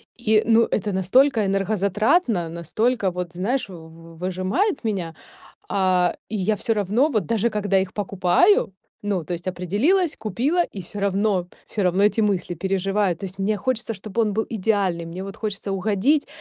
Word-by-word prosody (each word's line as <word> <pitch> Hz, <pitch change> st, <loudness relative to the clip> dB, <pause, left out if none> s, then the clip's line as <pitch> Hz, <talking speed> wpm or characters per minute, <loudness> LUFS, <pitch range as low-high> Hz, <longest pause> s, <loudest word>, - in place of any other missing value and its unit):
и 220 Hz, -2 st, +2 dB
ну 230 Hz, 0 st, +5 dB
это 205 Hz, -1 st, -1 dB
настолько 220 Hz, +5 st, +3 dB
энергозатратно, 200 Hz, -, +1 dB
настолько 190 Hz, +6 st, 0 dB
вот, 180 Hz, -1 st, -5 dB
знаешь, 210 Hz, +5 st, -1 dB
в 165 Hz, -1 st, -12 dB
выжимает 185 Hz, -, -1 dB
меня. 180 Hz, -7 st, -2 dB, 0.5 s
А 185 Hz, -2 st, +2 dB
и 220 Hz, -, -4 dB
я 210 Hz, +3 st, +1 dB
всё 225 Hz, -, 0 dB
равно, 215 Hz, -, +1 dB
вот 215 Hz, -, 0 dB
даже 230 Hz, 0 st, +1 dB
когда 205 Hz, -2 st, +1 dB
их 190 Hz, 0 st, -3 dB
покупаю, 195 Hz, -, +2 dB, 0.3 s
ну, 195 Hz, -5 st, -1 dB
то 175 Hz, -, -5 dB
есть 170 Hz, +2 st, -6 dB
определилась, 220 Hz, -, +1 dB
купила 270 Hz, -, 0 dB
и 195 Hz, -, -8 dB
всё 200 Hz, +4 st, -7 dB
равно, 195 Hz, -2 st, +1 dB, 0.2 s
всё 205 Hz, -, -2 dB
равно 185 Hz, +2 st, +2 dB
эти 210 Hz, +2 st, +3 dB
мысли 190 Hz, -4 st, 0 dB
переживаю. 195 Hz, +1 st, 0 dB
То 195 Hz, -, -7 dB
есть 185 Hz, 0 st, -8 dB
мне 205 Hz, +2 st, +1 dB
хочется, 240 Hz, -2 st, -1 dB
чтобы 215 Hz, +3 st, -3 dB
он 210 Hz, -2 st, 0 dB
был 220 Hz, +2 st, -1 dB
идеальный, 195 Hz, -5 st, 0 dB
мне 175 Hz, +3 st, -6 dB
вот 195 Hz, +2 st, -8 dB
хочется 205 Hz, -2 st, -4 dB
угодить 210 Hz, +10 st, +1 dB
200 Hz, 170 wpm, -23 LUFS, 185-220 Hz, 0.5 s, ну